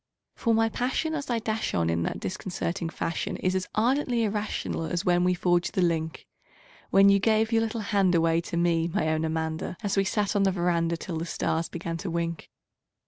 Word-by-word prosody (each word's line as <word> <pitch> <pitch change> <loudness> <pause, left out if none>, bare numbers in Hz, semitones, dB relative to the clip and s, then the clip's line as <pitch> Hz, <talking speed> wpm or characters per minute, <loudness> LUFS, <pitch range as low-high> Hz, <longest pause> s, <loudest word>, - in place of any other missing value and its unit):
For 230 -2 +1
my 225 0 +3
passion 255 +8 -1
as 285 -4 -4
I 240 - +1
dash 220 -1 -2
on 85 -1 +1
in 85 0 0
that - - -2
disconcerting 180 -2 -3
fashion 165 - -3
Is 185 - 0
as 185 -1 -1
ardently 245 +1 +2
irrational 210 -5 -2
as 175 +3 -2
when 175 -1 +3
we 180 0 +2
forged 175 0 +1
the 185 - +3
link 160 -2 -1 0.6
When 195 +1 +6
you 200 0 +5
gave 220 +2 +2
your 225 0 +3
little 225 0 -2
hand 200 -3 +2
away 165 0 +3
to 170 - -5
me, 170 -1 +2
my 160 -1 0
own 155 0 0
Amanda 160 +1 -2
An 205 - -1
we 195 - +3
sat 205 +1 0
'n 205 - +3
the 195 -1 +3
veranda 170 -2 0
till 165 0 -5
the 165 - -3
stars 165 0 -1
began 165 -1 -4
to 185 +2 -5
wink. 170 -1 -3
180 Hz, 205 wpm, -27 LUFS, 165-215 Hz, 0.6 s, When